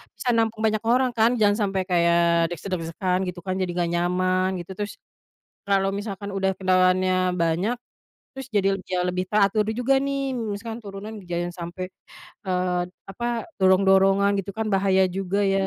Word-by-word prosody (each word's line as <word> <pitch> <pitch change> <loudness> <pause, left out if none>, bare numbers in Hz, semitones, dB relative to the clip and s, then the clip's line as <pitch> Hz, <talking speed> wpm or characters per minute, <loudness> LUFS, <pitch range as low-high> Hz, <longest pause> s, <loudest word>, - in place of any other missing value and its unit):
bisa 250 - -3
nampung 225 -1 0
banyak 215 -1 +2
orang 250 +2 +3
kan, 230 +1 +4
jangan 205 -1 +4
sampai 195 -1 -1
kayak 170 -1 +3
desak-desakan 180 +2 -2
gitu 180 0 -5
kan, 185 0 -2
jadi 185 -2 -1
nggak 175 -1 0
nyaman, 185 +2 +1
gitu. 175 - -12
Terus, 205 0 -4 0.8
kalau 195 -1 +2
misalkan 200 0 -5
udah 190 0 0
kendaraannya 185 0 +2
banyak, 170 +7 0 0.6
terus 270 0 -7
jadi 195 -3 +2
le 195 - -5
jauh 180 -1 0
lebih 180 +1 -2
teratur 210 0 +3
juga, 250 +3 +2
nih. 275 -1 -1
Misalkan 225 0 -4
turunan 200 +1 -8
jangan 175 0 -3
sampai, 175 +1 -6 0.6
eee, 180 -1 0 0.3
apa, 235 +5 -4 0.3
dorong-dorongan 195 +1 +4
gitu 195 0 -8
kan, 220 0 -1
bahaya 190 -1 +3
juga, 195 +2 -1
ya. 195 0 +2
190 Hz, 155 wpm, -24 LUFS, 180-205 Hz, 0.8 s, kan